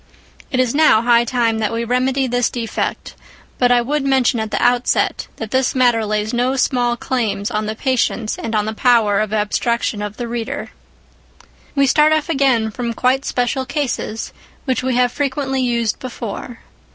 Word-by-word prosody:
It 255 - -1
is 255 -2 +2
now 285 -7 +4
high 235 0 +4
time 230 -2 0
that 215 -2 0
we 230 0 -2
remedy 255 +3 +1
this 245 -1 +1
defect; 230 -2 -4 0.5
but 245 -1 +3
I 240 -1 +4
would 290 +3 -1
mention 265 -3 +2
at 220 0 -3
the - - -1
outset, 245 0 +1
that 225 -2 -7
this 260 0 +1
matter 240 -4 +3
lays 215 +1 -1
no 250 +2 +1
small 245 -2 +1
claims 215 -6 -2
on 215 0 -2
the 215 - -3
patience 235 -3 0
and 230 -1 -3
on 210 -1 +1
the 220 - -3
power 220 -4 +3
of 215 -1 -1
abstraction 215 +1 -1
of 210 0 -5
the 240 - -4
reader. 235 -1 -4 1.0
We 280 -1 +4
start 300 +3 +4
off 310 0 0
again 265 -7 +2
from 235 +1 -4
quite 260 +3 +1
special 250 +2 -1
cases, 250 -5 -3 0.3
which 260 -4 0
we 260 -1 -1
have 245 -1 +3
frequently 270 -1 -1
used 235 -3 0
before. 240 -1 -7
245 Hz, 175 wpm, -18 LUFS, 225-260 Hz, 1.0 s, now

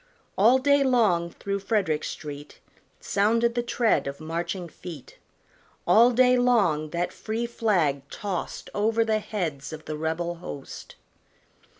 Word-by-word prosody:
All 230 +6 +5
day 280 +1 +3
long 215 -10 +2
through 200 +3 -4
Frederick 195 -7 0
street 145 -1 -7 0.4
Sounded 230 +4 +1
the 240 - 0
tread 235 - +1
of 140 0 -5
marching 170 +3 -4
feet; 160 -4 -11 0.7
All 225 +7 +6
day 250 +1 +4
long 205 -12 +2
that 170 +2 -2
free 225 +2 -3
flag 170 - 0
tost 200 -3 -5
Over 225 +2 +1
the 220 -1 +1
heads 165 -11 -4
of 155 -1 -9
the 155 - -4
rebel 160 +2 -2
host. 145 -5 -9
195 Hz, 130 wpm, -26 LUFS, 160-230 Hz, 0.7 s, All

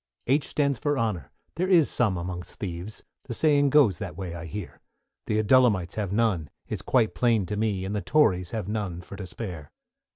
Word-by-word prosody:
=H= 140 +3 +2
stands 140 -4 0
for 145 -1 0
Honour, 105 - -2 0.3
there 180 +2 +1
is 170 -6 +6
some 105 -7 +1
amongst 90 0 -6
thieves, 90 +2 -6 0.2
The 120 - -4
saying 145 -1 +4
goes 130 - +4
that 90 -5 -6
way 90 -3 -5
I 85 0 -7
hear; 100 +1 -7 0.5
The 105 - +1
Adullamites 110 -5 +3
have 105 -4 -3
none, 100 -8 +1 0.2
it's - - -4
quite 120 -4 +2
plain 115 -5 +2
to 105 - -3
me; 105 -3 -1
And 100 +2 -3
the 105 - -1
Tories 95 - +2
have 110 -5 -4
none 100 -5 -3
for 95 - -10
to 95 -2 -7
spare. 90 -9 -7
105 Hz, 195 wpm, -26 LUFS, 90-125 Hz, 0.5 s, is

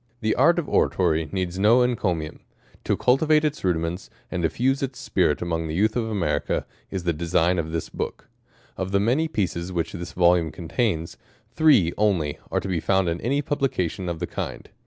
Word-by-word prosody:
The 110 -1 +1
art 165 +7 +4
of 165 -4 -1
Oratory 80 -4 +1
needs 95 -1 -2
no 115 +5 +5
encomium. 90 -10 -1 0.5
To - - +1
cultivate 150 +4 +3
its 150 0 -2
rudiments, 85 0 -1 0.2
and 90 - -2
diffuse 130 - +1
its 135 -1 -3
spirit - - 0
among 80 -1 -2
the 80 - -4
Youth 105 +4 +2
of 115 -2 -1
America, 90 -8 -1 0.2
is 95 -2 -4
the 85 -1 +1
design 85 +2 +1
of 80 -1 -3
this 80 -1 -3
Book. - - -5 0.5
Of 95 +1 -3
tha 100 - +4
many 125 +10 +2
pieces 95 - -2
which 85 -2 -2
this 85 +1 -6
volume 85 -2 +3
contains, 85 +1 -2 0.3
three 130 - +4
only 90 -9 +1
are - - 0
to - - -5
be 90 -3 0
found 95 +1 +1
in 85 +1 -3
any 140 +5 0
publication 95 - -1
of 85 - -3
the 85 - -3
kind. - - -6
95 Hz, 185 wpm, -24 LUFS, 85-120 Hz, 0.5 s, no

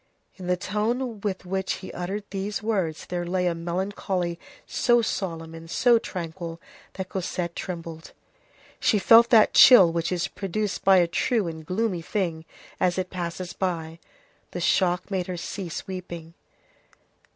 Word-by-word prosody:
In 185 -2 -8
the 180 0 +2
tone 220 +5 -2
with 190 -3 -3
which 190 +1 -1
he 190 - -8
uttered 195 +4 -4
these 200 +1 -3
words 190 -8 -1
there 175 -1 -3
lay 180 +1 -1
a 175 - +2
melancholy 175 0 -2 0.3
so 240 -1 +2
solemn 165 -6 -3
and 165 0 -10
so 240 +5 +4
tranquil, 170 -3 -6 0.3
that 185 -1 -6
Cosette 175 -2 -3
trembled. 165 -3 -6 0.7
She 215 - +3
felt 230 +3 +7
that 220 -3 +6
chill 195 -10 +9
which 170 +1 -1
is 180 +1 0
produced 205 +2 -3
by 190 -1 +6
a 175 - +5
true 200 +4 0
and 160 -1 -6
gloomy 185 +1 -1
thing 165 -3 -2 0.3
as 180 0 +1
it 185 -1 -2
passes 175 0 -4
by. 165 -3 -3 0.5
The - - -3
shock 180 +2 +1
made 185 -2 -1
her 180 -1 -4
cease 175 0 -5
weeping. 175 -3 -7
180 Hz, 150 wpm, -25 LUFS, 170-200 Hz, 0.7 s, chill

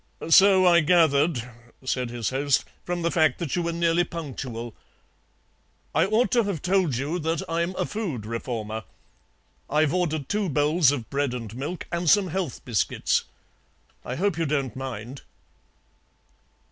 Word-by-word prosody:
"So 190 +2 +7
I 175 -1 +6
gathered;" 155 -5 +3 0.4
said 125 -2 -1
his 120 -1 -3
host, 140 +1 +1 0.2
"from 175 -1 -3
the 170 - +1
fact 155 -5 +3
that 165 -6 -3
you 175 - 0
were 170 0 -1
nearly 170 +1 +2
punctual. 130 -9 -6 1.2
I 160 +4 +3
ought 220 +4 +2
to 240 - +4
have 200 -7 -3
told 185 -6 +2
you 145 +8 -2
that 160 0 -1
I'm 170 +2 -1
a - - -1
Food 170 - -4
Reformer. 110 -1 -4 0.9
I've 155 +1 +2
ordered 160 -6 -1
two 205 -2 -1
bowls 150 +1 +3
of 125 -6 -4
bread 140 -2 0
and 115 -3 -7
milk 150 +8 -5
and 170 -1 0
some 200 0 +4
health 175 -5 -4
biscuits. 115 -6 0 0.8
I 125 - -4
hope 180 +1 0
you 165 - 0
don't 140 -3 -1
mind." 130 -1 -6
155 Hz, 150 wpm, -25 LUFS, 130-175 Hz, 1.2 s, So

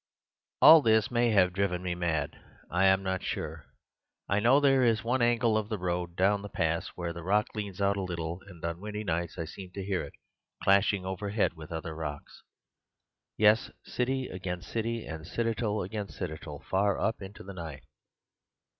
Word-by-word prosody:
"All 160 -1 +11
this 110 -3 +3
may 120 0 +3
have 90 -4 +4
driven 90 -2 0
me 90 -1 -1
mad; 80 -5 -2 0.3
I 90 +3 +3
am 95 0 +4
not 95 -1 -1
sure. - - -4 0.6
I 100 - +2
know 120 +6 +5
there 135 -2 +4
is 115 -2 +3
one 125 +2 +1
angle 120 -1 +3
of 110 -1 -1
the 110 - -2
road 90 -1 -2
down 100 +2 +2
the 100 - -7
pass 80 -2 0
where 85 -1 -3
the 85 - -7
rock 105 +5 +1
leans 100 -3 -5
out 100 0 +2
a - - -1
little, 85 -1 -4
and 85 -4 -9
on 85 0 -3
windy 105 0 -4
nights 85 -3 -2
I 85 - -3
seem 90 +3 -9
to 100 - -5
hear 95 -2 0
it - - -9 0.5
clashing 100 -1 +3
overhead 100 +2 -1
with 80 -1 -11
other 80 0 -4
rocks— 75 -2 -6 1.0
yes, 110 +1 +4 0.2
city 130 +1 -1
against 90 -1 -5
city 115 0 -2
and 80 -1 -7
citadel 115 -3 -1
against 100 +1 -5
citadel, 75 -1 -6
far 100 +1 +1
up 110 - -1
into 95 +1 -9
the 100 - -8
night. 80 -6 -7
95 Hz, 180 wpm, -29 LUFS, 85-110 Hz, 1.0 s, All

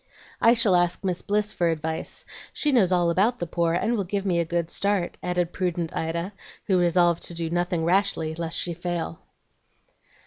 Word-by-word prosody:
"I 230 +1 +6
shall 220 -6 +4
ask 175 +1 +1
Miss 180 -2 -1
Bliss 210 +1 0
for 170 -1 +1
advice; 160 0 -3 0.3
she 300 - +1
knows 210 -9 +4
all 175 -2 +3
about 210 +8 +2
the 175 - -3
poor, 170 0 0
and 225 +7 +1
will 205 - 0
give 200 +2 -3
me 175 -3 +1
a 170 - +1
good 170 0 -2
start," 200 -3 0
added 180 -1 -1
prudent 175 -3 -2
Ida, 170 +4 -2 0.3
who 190 -3 +2
resolved 175 -1 +3
to 170 - -6
do 165 -1 -3
nothing 175 -1 0
rashly 175 -3 +1
lest 165 0 -3
she 175 - -1
should 170 - -17
fail. 175 - -3
175 Hz, 195 wpm, -25 LUFS, 170-195 Hz, 0.3 s, I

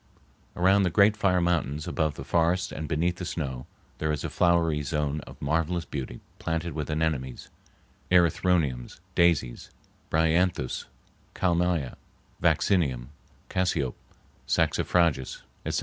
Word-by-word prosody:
Around 95 +3 +4
the 95 - +2
great 100 +4 +5
fire 90 -3 +2
mountains, 80 -4 0
above 80 -3 0
the - - -7
forests 85 +2 +1
and 75 +1 -5
beneath 85 +4 0
the 90 - -6
snow, 65 -7 -4 0.3
there 80 0 0
is 75 - -3
a - - -3
flowery 85 -4 +2
zone 75 +1 -1
of - - -12
marvelous 80 +4 0
beauty 65 -4 -6 0.2
planted 80 0 -2
with 75 0 -4
anemones, 75 -5 -2 0.6
erythroniums, 85 -7 +2
daisies, 85 -8 +2 0.4
bryanthus, 80 -3 +1 0.5
kalmia, 85 -5 0 0.4
vaccinium, 70 -10 +2 0.4
cassiope, 80 -8 0 0.5
saxifrages, 80 -7 +1 0.2
etc. - - 0
80 Hz, 120 wpm, -27 LUFS, 70-90 Hz, 0.6 s, great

